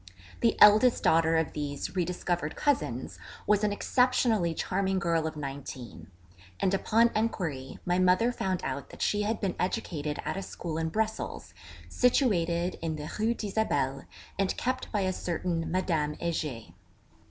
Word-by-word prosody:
The 230 Hz, -2 st, +2 dB
eldest 215 Hz, +4 st, +7 dB
daughter 165 Hz, 0 st, +4 dB
of 160 Hz, -3 st, 0 dB
these 145 Hz, +3 st, -4 dB
re 180 Hz, -, +2 dB
discovered 175 Hz, -2 st, -2 dB
cousins 290 Hz, -1 st, -1 dB, 0.3 s
was 210 Hz, 0 st, +3 dB
an 210 Hz, -, +2 dB
exceptionally 225 Hz, -6 st, +2 dB
charming 190 Hz, +2 st, 0 dB
girl 165 Hz, -3 st, +1 dB
of 160 Hz, -, -5 dB
nineteen; 135 Hz, -4 st, -7 dB, 0.5 s
and 195 Hz, -, +1 dB
upon 225 Hz, +4 st, +3 dB
enquiry 165 Hz, -12 st, -2 dB
my 180 Hz, 0 st, +1 dB
mother 185 Hz, +6 st, +4 dB
found 190 Hz, -6 st, -2 dB
out 135 Hz, +1 st, -4 dB
that -, -, -5 dB
she 210 Hz, -, +1 dB
had 215 Hz, +2 st, -1 dB
been 195 Hz, -3 st, -1 dB
educated 150 Hz, -5 st, -2 dB
at -, -, -2 dB
a -, -, -2 dB
school 170 Hz, -4 st, -5 dB
in 160 Hz, 0 st, -1 dB
Brussels, 220 Hz, +4 st, -3 dB, 0.3 s
situated 180 Hz, -, +1 dB
in 165 Hz, -1 st, -2 dB
the 150 Hz, 0 st, -6 dB
Rue 225 Hz, +2 st, +2 dB
d'Isabelle, 145 Hz, -, -1 dB, 0.3 s
and 195 Hz, -1 st, 0 dB
kept 255 Hz, +1 st, -2 dB
by 210 Hz, -, 0 dB
a 185 Hz, -1 st, 0 dB
certain 170 Hz, -1 st, -2 dB
Madame 165 Hz, -4 st, 0 dB
Heger. 150 Hz, -, -4 dB
180 Hz, 155 wpm, -29 LUFS, 160-210 Hz, 0.5 s, eldest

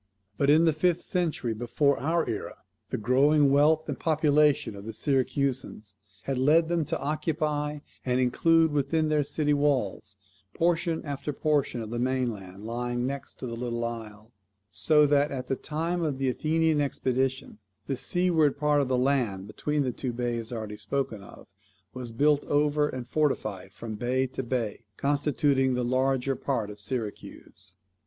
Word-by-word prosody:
But, 140 Hz, +6 st, +1 dB
in 155 Hz, +3 st, +6 dB
the 160 Hz, -, +4 dB
fifth 175 Hz, +2 st, +1 dB
century 160 Hz, -10 st, -1 dB
before 125 Hz, +5 st, +1 dB
our 165 Hz, +3 st, 0 dB
era, 115 Hz, -3 st, -5 dB, 0.3 s
the -, -, -2 dB
growing 140 Hz, +5 st, +4 dB
wealth 150 Hz, +3 st, +4 dB
and 145 Hz, -, -4 dB
population 150 Hz, -6 st, +2 dB
of 100 Hz, -, -9 dB
the 110 Hz, +1 st, -6 dB
Syracusans 130 Hz, -5 st, -1 dB, 0.3 s
had 135 Hz, 0 st, -2 dB
led 160 Hz, +5 st, +4 dB
them 170 Hz, -2 st, +1 dB
to -, -, -2 dB
occupy 150 Hz, 0 st, -2 dB, 0.2 s
and 125 Hz, 0 st, +1 dB
include 160 Hz, +6 st, +3 dB
within 150 Hz, +2 st, +1 dB
their 150 Hz, -1 st, +2 dB
city 150 Hz, +1 st, 0 dB
walls 140 Hz, -9 st, 0 dB, 0.4 s
portion 165 Hz, -1 st, 0 dB
after 145 Hz, +1 st, -4 dB
portion 145 Hz, -4 st, 0 dB
of 110 Hz, 0 st, -7 dB
the 120 Hz, -, -2 dB
mainland 115 Hz, -7 st, -2 dB
lying 120 Hz, +1 st, -2 dB
next 140 Hz, +1 st, -5 dB
to -, -, -7 dB
the 115 Hz, -1 st, -4 dB
little 120 Hz, 0 st, -3 dB
isle; 110 Hz, -1 st, -7 dB, 0.4 s
so 150 Hz, +6 st, +4 dB
that 145 Hz, 0 st, +3 dB
at 130 Hz, -2 st, -4 dB
the 135 Hz, -, +1 dB
time 165 Hz, +5 st, -2 dB
of 150 Hz, -5 st, -1 dB
the 135 Hz, -1 st, 0 dB
Athenian 155 Hz, +3 st, +1 dB
expedition 130 Hz, -3 st, -1 dB, 0.3 s
the 135 Hz, -, -2 dB
seaward 160 Hz, +2 st, +2 dB
part 150 Hz, -1 st, +2 dB
of 140 Hz, -, -1 dB
the 130 Hz, -1 st, +1 dB
land 125 Hz, -8 st, 0 dB
between 145 Hz, +8 st, -1 dB
the 125 Hz, -2 st, -2 dB
two 125 Hz, 0 st, -4 dB
bays 120 Hz, -1 st, -3 dB
already 110 Hz, -3 st, -5 dB
spoken 135 Hz, -6 st, -3 dB
of 100 Hz, -, -13 dB, 0.5 s
was 125 Hz, -2 st, -6 dB
built 145 Hz, +5 st, +2 dB
over, 150 Hz, 0 st, +2 dB
and 130 Hz, -2 st, -5 dB
fortified 120 Hz, -10 st, -1 dB
from 110 Hz, +3 st, -7 dB
bay 125 Hz, +4 st, 0 dB
to 130 Hz, 0 st, -4 dB
bay; 120 Hz, -3 st, -3 dB
constituting 140 Hz, -2 st, +1 dB
the 125 Hz, -1 st, -1 dB
larger 130 Hz, +1 st, +1 dB
part 115 Hz, -8 st, -2 dB
of 105 Hz, -, -11 dB
Syracuse. 110 Hz, 0 st, -6 dB
135 Hz, 160 wpm, -27 LUFS, 120-150 Hz, 0.5 s, in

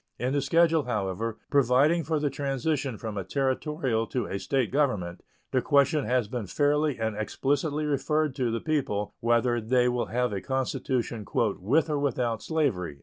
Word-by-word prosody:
In 130 Hz, +2 st, -1 dB
the 145 Hz, -, +1 dB
schedule, 165 Hz, +1 st, +3 dB
however, 105 Hz, -1 st, -2 dB
providing 140 Hz, +5 st, +4 dB
for 155 Hz, +1 st, 0 dB
the 145 Hz, -1 st, 0 dB
transition 135 Hz, -2 st, -2 dB
from 105 Hz, -2 st, -5 dB
a -, -, -3 dB
Territorial 130 Hz, -, -1 dB
to 125 Hz, -4 st, -2 dB
a 100 Hz, -, -4 dB
State 130 Hz, -1 st, 0 dB
government 105 Hz, -12 st, 0 dB, 0.3 s
the 130 Hz, -, +2 dB
question 140 Hz, +2 st, +3 dB
has 125 Hz, -3 st, +1 dB
been 115 Hz, -2 st, -4 dB
fairly 145 Hz, +3 st, +1 dB
and 110 Hz, -1 st, -2 dB
explicitly 145 Hz, +7 st, -1 dB
referred 150 Hz, 0 st, 0 dB
to 125 Hz, -3 st, +1 dB
the 115 Hz, 0 st, -2 dB
people 130 Hz, -10 st, -1 dB
whether 120 Hz, +1 st, +2 dB
they 125 Hz, +2 st, +2 dB
will 125 Hz, -1 st, 0 dB
have 125 Hz, -1 st, 0 dB
a 100 Hz, -, -3 dB
constitution 130 Hz, -3 st, -2 dB
"with 115 Hz, -, +2 dB
or 150 Hz, -2 st, -1 dB
without 120 Hz, -5 st, -1 dB
slavery." 115 Hz, -, -1 dB
130 Hz, 165 wpm, -27 LUFS, 115-145 Hz, 0.3 s, providing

